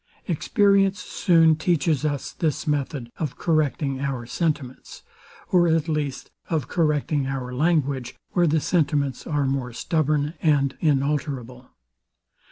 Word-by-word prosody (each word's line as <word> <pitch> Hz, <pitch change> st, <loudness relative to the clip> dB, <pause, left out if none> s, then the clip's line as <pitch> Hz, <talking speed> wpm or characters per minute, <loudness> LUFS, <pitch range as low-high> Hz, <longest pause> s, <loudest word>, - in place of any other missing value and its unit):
Experience 200 Hz, +2 st, +2 dB
soon 165 Hz, -3 st, +3 dB
teaches 160 Hz, -3 st, +1 dB
us 150 Hz, -1 st, -2 dB
this 155 Hz, -3 st, -2 dB
method 140 Hz, -4 st, -2 dB
of 145 Hz, -6 st, -3 dB
correcting 150 Hz, -4 st, 0 dB
our 135 Hz, -3 st, -3 dB
sentiments, 140 Hz, -1 st, -3 dB, 0.5 s
or 175 Hz, -2 st, +4 dB
at 165 Hz, -1 st, +1 dB
least, 150 Hz, -4 st, -3 dB, 0.2 s
of 155 Hz, -6 st, -1 dB
correcting 150 Hz, -3 st, 0 dB
our 130 Hz, -2 st, -4 dB
language, 140 Hz, -4 st, 0 dB, 0.2 s
where 175 Hz, -2 st, +3 dB
the 155 Hz, +1 st, +2 dB
sentiments 145 Hz, -5 st, 0 dB
are 145 Hz, -3 st, 0 dB
more 135 Hz, -2 st, -2 dB
stubborn 150 Hz, +3 st, 0 dB
and 140 Hz, -4 st, +2 dB
inalterable. 140 Hz, -4 st, -1 dB
150 Hz, 120 wpm, -24 LUFS, 135-160 Hz, 0.5 s, or